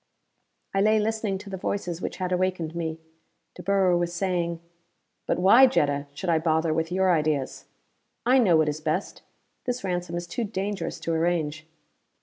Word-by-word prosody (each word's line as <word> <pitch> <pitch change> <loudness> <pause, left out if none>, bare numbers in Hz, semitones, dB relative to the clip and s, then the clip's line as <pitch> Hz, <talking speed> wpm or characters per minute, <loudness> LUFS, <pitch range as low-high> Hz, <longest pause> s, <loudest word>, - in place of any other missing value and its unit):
I 195 - +2
lay 215 +2 +4
listening 215 -2 -1
to 200 +1 -10
the 190 - -4
voices 180 -2 -3
which - - -4
had 185 -1 -3
awakened 180 -3 -1
me. 165 -1 -3 0.5
De - - -10
Boer 190 -1 +3
was 175 0 0
saying: 170 -2 -1 0.7
"But - - +1
why, 220 +9 +7
Jetta, 145 - 0
should 190 - -5
I 165 -2 +3
bother 160 0 +1
with 160 +1 -1
your 185 0 +3
ideas? 150 -4 -1 0.6
I 255 +2 +5
know 185 -9 +5
what 155 -1 +3
is 150 +1 -4
best. 155 +5 -2 0.4
This 250 -2 -2
ransom 175 -2 -2
is 175 - -4
too 175 +8 -3
dangerous 200 -1 -3
to 165 - -1
arrange." 160 -2 -1
175 Hz, 170 wpm, -26 LUFS, 160-195 Hz, 0.7 s, why